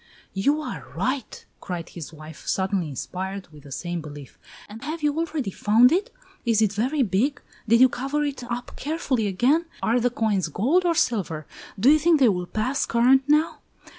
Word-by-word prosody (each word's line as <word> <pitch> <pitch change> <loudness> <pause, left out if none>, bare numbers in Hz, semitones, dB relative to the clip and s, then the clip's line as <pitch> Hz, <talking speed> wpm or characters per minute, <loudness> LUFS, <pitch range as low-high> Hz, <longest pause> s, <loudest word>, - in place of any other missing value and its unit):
"You 285 +11 +1
are - - -6
right!" 260 -1 -3
cried 175 -3 -5
his 165 -4 -8
wife, 155 0 -12
suddenly 190 -2 0
inspired 190 +7 -5
with 150 -2 -16
the 140 - -12
same 175 +4 -4
belief; 145 -4 -11 0.3
"and 220 +4 -11
have 310 +2 -5
you 295 -1 +2
already 315 -9 -2
found 225 +7 +4
it? 405 +8 0 0.3
Is 230 -3 +2
it 215 -2 +2
very 260 +7 +1
big? 230 +8 0 0.3
Did 230 +2 +5
you 260 - +9
cover 275 +4 -2
it 280 -3 -3
up 240 0 -5
carefully 275 -7 -1
again? 255 - +2 0.2
Are 235 +2 +2
the 245 +1 +2
coins 215 -6 0
gold 275 - +1
or 340 -1 +2
silver? 180 - 0 0.3
Do 250 +8 +6
you 310 - +5
think 325 0 +4
they 255 -4 +6
will 180 -3 -1
pass 250 +8 -1
current 255 +3 +4
now? 300 +2 +2
235 Hz, 185 wpm, -24 LUFS, 190-285 Hz, 0.3 s, you